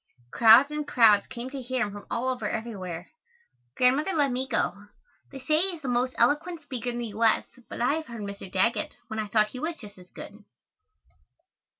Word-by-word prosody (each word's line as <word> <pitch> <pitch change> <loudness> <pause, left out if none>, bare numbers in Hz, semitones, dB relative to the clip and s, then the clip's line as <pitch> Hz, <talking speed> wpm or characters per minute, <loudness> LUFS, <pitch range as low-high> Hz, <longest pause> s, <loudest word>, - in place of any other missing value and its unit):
Crowds 235 +5 +7
and 300 -1 -4
crowds 215 -4 +5
came 245 +2 -7
to 275 -1 -6
hear 255 0 -1
him 205 - -6
from 205 0 -10
all 255 +2 -1
over 250 -5 -2
everywhere. 185 -7 -5 0.6
Grandmother 275 +9 +2
let 290 -4 +2
me 255 +2 -2
go. 205 -5 -2 0.4
They 275 - -8
say 305 +4 +1
he 375 -1 -1
is 310 - -15
the - - -4
most 250 +1 0
eloquent 310 +7 +1
speaker 250 -4 -4
in 240 - -4
the 240 - -3
U. 215 +3 -3
S., 225 - +3 0.2
but - - -6
I 250 +4 +3
have 320 - -6
heard 235 -2 -8
Mr. 200 -2 -7
Daggett 210 +6 0
when 220 - -4
I 215 - -2
thought 215 +1 +2
he 250 - -8
was 320 +4 -3
just 205 -4 -13
as 180 0 -16
good. 205 +1 -11
240 Hz, 210 wpm, -27 LUFS, 215-275 Hz, 0.6 s, Crowds